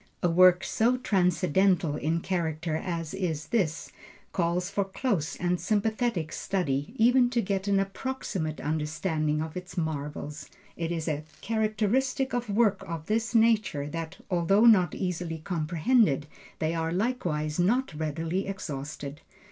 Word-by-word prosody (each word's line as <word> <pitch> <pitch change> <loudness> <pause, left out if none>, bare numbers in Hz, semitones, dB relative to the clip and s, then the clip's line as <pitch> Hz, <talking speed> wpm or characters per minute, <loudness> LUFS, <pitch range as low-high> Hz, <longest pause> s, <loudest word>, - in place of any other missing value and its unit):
A 175 - +3
work 180 +1 +6
so 235 +6 +2
transcendental 180 -5 +2
in 160 +3 -1
character 165 -3 -2
as 165 -1 -3
is 160 -6 -3
this, 175 -9 0 0.4
calls 175 0 0
for 200 +1 0
close 190 - -1
and 175 0 -1
sympathetic 215 -5 0
study 145 - -2
even 245 +1 +5
to 240 -1 0
get 195 -2 -1
an 200 -1 +3
approximate 195 - -3
understanding 155 0 -1
of 160 -1 -7
its 180 +1 -7
marvels. 150 -2 -4 0.3
It 165 0 -3
is 165 -1 -3
a 150 -1 -1 0.2
characteristic 225 +5 0
of 245 -2 -2
works 205 -1 +2
of 165 -2 -5
this 225 +4 -1
nature, 215 -10 +3
that 165 +1 -5
although 185 +5 +4
not 185 -8 +6
easily 180 -3 -3
comprehended, 160 - +1 0.3
they 160 +1 -1
are 165 -1 -1
likewise 175 -7 -1
not 235 +5 +2
readily 160 +5 -2
exhausted. 150 -5 -6
180 Hz, 135 wpm, -28 LUFS, 155-210 Hz, 0.4 s, work